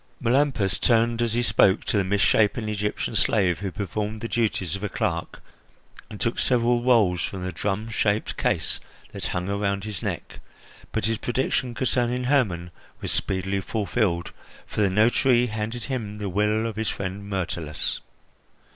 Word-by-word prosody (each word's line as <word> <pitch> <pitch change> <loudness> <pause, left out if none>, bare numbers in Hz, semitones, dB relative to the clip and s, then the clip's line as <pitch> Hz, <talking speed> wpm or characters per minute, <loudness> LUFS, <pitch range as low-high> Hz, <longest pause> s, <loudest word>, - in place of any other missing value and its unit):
Melampus 120 -6 +2
turned, 115 0 +3
as 115 -2 +1
he 120 +1 +1
spoke, 105 -3 +4
to - - 0
the 100 - +3
misshapen 105 +3 +2
Egyptian 105 0 -2
slave 95 -5 +2
who 100 -1 -2
performed 105 +3 -3
the 115 - -2
duties 105 -7 0
of 100 - -6
a 105 - -1
clerk, 85 -3 -2 0.7
and 105 - -8
took 115 - 0
several 120 -1 +3
rolls 110 -8 +4
from 95 -2 -4
the 95 - -2
drumshaped 105 +3 -1
case - - 0 0.3
that - - -4
hung 90 +1 -2
around 100 -1 -1
his 105 -5 -5
neck; - - -4 0.5
but - - -1
his 110 0 0
prediction 125 0 -1
concerning 125 0 0
Hermon 105 -11 +1 0.3
was - - -3
speedily 95 +1 -1
fulfilled, 100 -4 -1 0.3
for - - -3
the 100 - +4
notary 120 +5 +4
handed 110 +1 -4
him 110 -6 -4
the 105 -2 -3
will 105 +4 +1
of 110 -2 -4
his 110 -2 0
friend 100 +1 -4
Myrtilus. 85 -5 -2
105 Hz, 155 wpm, -25 LUFS, 95-115 Hz, 0.7 s, spoke